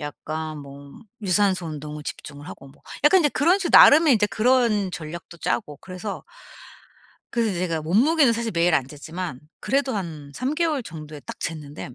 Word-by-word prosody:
약간 155 +1 -6
뭐 140 0 -12 0.3
유산소 190 -2 +1
운동을 150 -1 -7
집중을 145 0 -8
하고 140 - -11
뭐 135 - -21 0.2
약간 370 +6 +6
이제 295 - +3
그런 345 +7 +3
식으로 370 -3 +3
나름의 300 -1 +7
이제 210 -2 +2
그런 215 -2 +2
전략도 170 +1 -8
짜고 145 +2 -2
그래서, 190 +2 -7 1.1
그래서 230 -4 0
제가 170 -3 -2
몸무게는 250 - +3
사실 230 -1 -3
매일 170 0 +2
안 135 -4 +1
쟀지만 150 0 -7 0.2
그래도 270 -1 0
한 155 -6 -6
3 265 +4 -2
개월 315 -4 0
정도에 155 -5 -9
딱 - - -9
쟀는데 150 -4 -6
175 Hz, 345 characters per minute, -23 LUFS, 150-235 Hz, 1.1 s, 나름의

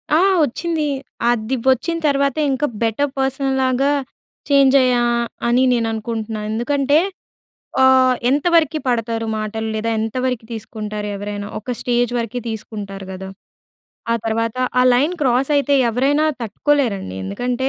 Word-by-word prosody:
ఆ! - - +5 0.3
వచ్చింది. 315 +4 -2 0.4
అది 240 +1 0 0.2
వచ్చిన 325 +7 0
తర్వాత 280 -1 +1 0.2
ఇంకా 265 +2 0 0.2
బెటర్ 230 +6 0
పర్సన్ 270 0 0
లాగా 260 +2 +2 0.6
చేంజ్ 275 -1 +5
అయ్యా 250 -1 +3 0.5
అని 245 +2 +3
నేను 230 -2 +1
అనుకుంటున్నా. 220 -1 -4
ఎందుకంటే 280 +6 +2 0.8
ఆహ్, 260 -1 +5
ఎంతవరకి 315 +2 +2
పడతారు 230 -2 -1
మాటలు 215 +1 -3
లేదా, 220 +1 -1
ఎంతవరకి 245 +1 -2
తీసుకుంటారు 215 -2 -5
ఎవరైనా. 205 0 -5
ఒక 245 +4 -4
స్టేజ్ 245 -1 0
వరకి 235 +1 -3
తీసుకుంటారు 205 -3 -6
గదా! 190 0 -7 0.8
ఆ - - +3
తర్వాత 225 +1 -1 0.2
ఆ - - +5
లైన్ 285 +8 +2
క్రాస్ 265 0 +2
అయితే 285 0 +2 0.2
ఎవరైనా 275 +6 +2 0.2
తట్టుకోలేరండి. 225 - -1
ఎందుకంటే, 245 - -2
245 Hz, 125 wpm, -19 LUFS, 220-275 Hz, 0.8 s, ఆ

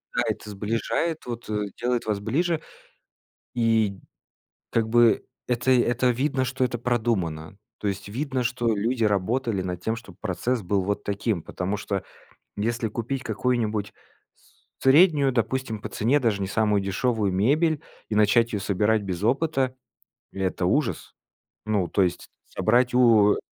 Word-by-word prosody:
да, - - +3
это 105 - -4
сближает, 115 +10 -2
вот, 120 -2 -6
э, 105 -1 -1 0.2
делает 120 -1 0
вас 105 -2 -1
ближе, 160 +9 0 0.9
и 110 -4 +2 0.7
как 115 -1 +1
бы 120 0 +4 0.2
это 125 +1 0
это 125 0 +3
видно, 130 +1 0
что 130 - -1
это 120 -1 -2
продумано. 100 -9 -1 0.2
То - - -5
есть 100 +1 -4
видно, 130 +3 -2
что 120 -2 0
люди 115 +3 0
работали 105 +1 0
над 90 -1 -4
тем, 110 +4 -1
чтоб 100 -6 -12
процесс 110 +4 -2
был 95 +2 0
вот 100 +2 -2
таким. 100 -3 -1
Потому 95 +3 -3
что 100 -1 -3 0.5
если 115 +3 -1
купить 125 +4 -4
какую-нибудь 110 -2 -1 0.4
с - - -21
среднюю, 145 -1 +5
допустим, 120 -2 -1
по - - -6
цене, 130 +7 +1
даже 110 -5 +1
не - - -1
самую 105 -1 +2
дешевую 105 +1 0
мебель, 145 - +2 0.3
и - - -2
начать 105 +3 +4
ее 105 - -1
собирать 105 +2 +1
без 95 -2 -4
опыта- 135 +1 +1 0.6
это 95 -1 -2
ужас. 130 +8 0 0.5
Ну, 105 -4 +1
то 100 - +2
есть 90 - -1 0.2
собрать 125 +2 +2
у 110 -5 +5
115 Hz, 150 wpm, -25 LUFS, 100-125 Hz, 0.9 s, среднюю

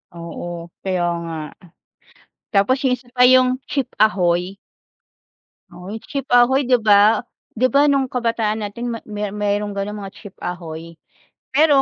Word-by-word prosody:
Oo. 170 0 -7
Kaya 185 -2 0 0.2
nga. 165 -1 -5 1.2
Tapos 245 +7 +2
yung 260 -2 +2
isa 245 - -22
pa, 250 - +3
yung 255 +1 +5
chip 275 -4 0 0.2
ahoy. 180 -2 +1 1.2
Oo, 180 - -11
yung 225 0 -7
chip 275 -1 -4
ahoy 265 +3 +4
'di 250 0 +4
ba? 210 0 +5 0.4
'Di 255 +3 +4
ba, 285 +1 +5
no'ng 275 -2 +2
kabataan 230 -3 0
natin 235 +4 -4
ma 230 - -5
may 210 -1 -3
mayro'ng 205 0 -1
gano'ng 200 +1 -3
mga 195 -1 -8
chip 205 - -12
ahoy, 165 -2 -7 0.6
pero 290 -1 +5
210 Hz, 145 wpm, -20 LUFS, 190-255 Hz, 1.2 s, yung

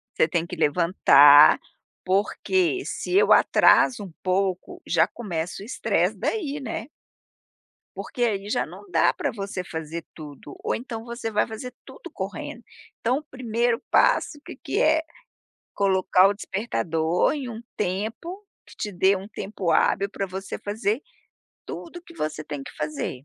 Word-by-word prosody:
Você 160 - +3
tem 170 -1 -1
que 180 - -7
levantar, 150 -3 +6 0.5
porque 355 - +1
se 360 - -3
eu 415 +3 +4
atraso 240 -5 +5
um 190 - -9
pouco 190 - -1
já - - +3
começa 180 -4 -5
o - - -9
estresse 235 - 0
daí, 295 -10 -2
né? 230 -2 -5 1.1
Porque 245 - -4
aí 205 -3 -1
já - - 0
não 405 - -13
dá - - +3
para - - -2
você 195 -3 -5
fazer 160 0 -6
tudo 145 -2 -11
ou - - 0
então 230 -2 -5
você 235 -1 -5
vai 210 -1 +1
fazer 235 +3 -7
tudo - - -11
correndo, - - -6 0.4
então 250 +4 +1
o 300 - -6
primeiro 240 -3 -1
passo - - +3
que - - -8
que - - -3
é, 315 - +4 0.7
colocar 190 -1 +4
o 205 - 0
despertador 175 -6 0
em 275 -4 -5
um 225 0 -8
tempo 220 - -3 0.2
que - - -15
te 210 - -4
dê 190 +2 +3
um 190 +2 -8
tempo 195 -4 -4
hábil 195 +4 +2
para 195 - -3
você 190 +1 -6
fazer 210 +4 -2 0.6
tudo 345 +1 -8
que 340 - -15
você 155 - -3
tem 145 -2 -6
que - - -11
fazer. 145 -3 -4
200 Hz, 155 wpm, -24 LUFS, 175-245 Hz, 1.1 s, levantar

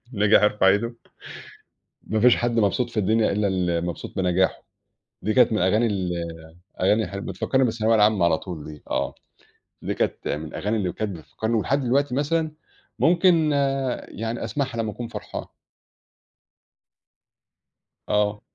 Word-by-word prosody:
الناجح 105 +1 +4
يرفع 105 -2 +4
إيده. 115 +5 +1 1.1
ما 110 0 -1
فيش 125 +1 +6
حد 120 - 0
مبسوط 115 +4 +1
في 115 - -14
الدنيا 110 +3 +2
إلّا 100 0 +1
المبسوط 85 -2 -2
بنجاحه. 95 0 +1 0.6
دي 110 - 0
كانت 120 -2 +5
من 110 - +1
الأغاني 105 +6 +3
ال 95 -5 -1 0.7
أغاني 105 +4 +3
حل 100 0 -6
بتفكّرني 115 +9 0
بالثانوية 115 -1 +1
العامة 105 -4 +4
على 80 -2 +3
طول 85 -5 -7
دي 75 -1 -10
آه. - - -1 0.7
دي - - -2
كانت - - -2
من 75 +2 -2
الأغاني 105 +8 -3
اللي 95 -4 -1
كانت 100 -5 -4
بتفكّرني 110 +8 -4
ولحد 135 +5 +1
دلوقتي 135 +1 +1
مثلًا 155 +3 0 0.5
ممكن 170 -3 +4 0.6
يعني 115 +2 -4
أسمعها 135 -5 -3
لمّا 110 -1 -1
أكون 120 -1 -6
فرحان. - - -6 2.6
آه. 105 0 +1
110 Hz, 140 wpm, -24 LUFS, 95-120 Hz, 2.6 s, فيش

